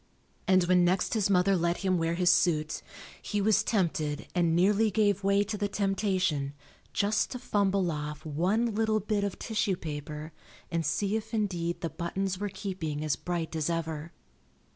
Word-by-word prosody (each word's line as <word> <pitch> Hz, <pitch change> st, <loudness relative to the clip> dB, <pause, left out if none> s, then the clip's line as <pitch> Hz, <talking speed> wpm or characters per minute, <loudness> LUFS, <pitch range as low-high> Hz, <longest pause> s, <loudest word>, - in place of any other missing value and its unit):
And 185 Hz, -1 st, +5 dB
when 180 Hz, 0 st, +4 dB
next 180 Hz, +2 st, +1 dB
his 215 Hz, -3 st, +1 dB
mother 195 Hz, 0 st, +4 dB
let 170 Hz, 0 st, +1 dB
him 185 Hz, -2 st, +2 dB
wear 165 Hz, +1 st, 0 dB
his 180 Hz, 0 st, +4 dB
suit, 155 Hz, -3 st, +2 dB, 0.4 s
he 205 Hz, -, -2 dB
was 215 Hz, +1 st, +4 dB
tempted 170 Hz, -9 st, 0 dB
and 170 Hz, -2 st, +2 dB
nearly 205 Hz, +5 st, +4 dB
gave 205 Hz, -1 st, +2 dB
way 200 Hz, +1 st, +3 dB
to 210 Hz, +1 st, -4 dB
the 205 Hz, -, +1 dB
temptation 190 Hz, -8 st, 0 dB, 0.4 s
just 205 Hz, +1 st, +1 dB
to 250 Hz, -, -5 dB
fumble 200 Hz, -6 st, +1 dB
off 150 Hz, 0 st, -5 dB
one 190 Hz, +10 st, +1 dB
little 220 Hz, 0 st, +1 dB
bit 210 Hz, 0 st, -1 dB
of 200 Hz, -2 st, -2 dB
tissue 210 Hz, -3 st, 0 dB
paper 150 Hz, -1 st, -6 dB, 0.4 s
and 165 Hz, -1 st, 0 dB
see 200 Hz, +7 st, 0 dB
if 220 Hz, +1 st, -5 dB
indeed 175 Hz, -5 st, -1 dB
the 165 Hz, -, -2 dB
buttons 185 Hz, +2 st, -2 dB
were 205 Hz, 0 st, -2 dB
keeping 185 Hz, -6 st, -4 dB
as 155 Hz, -2 st, +1 dB
bright 170 Hz, -2 st, -3 dB
as 155 Hz, 0 st, 0 dB
ever. 165 Hz, -1 st, -3 dB
185 Hz, 170 wpm, -29 LUFS, 165-205 Hz, 0.4 s, And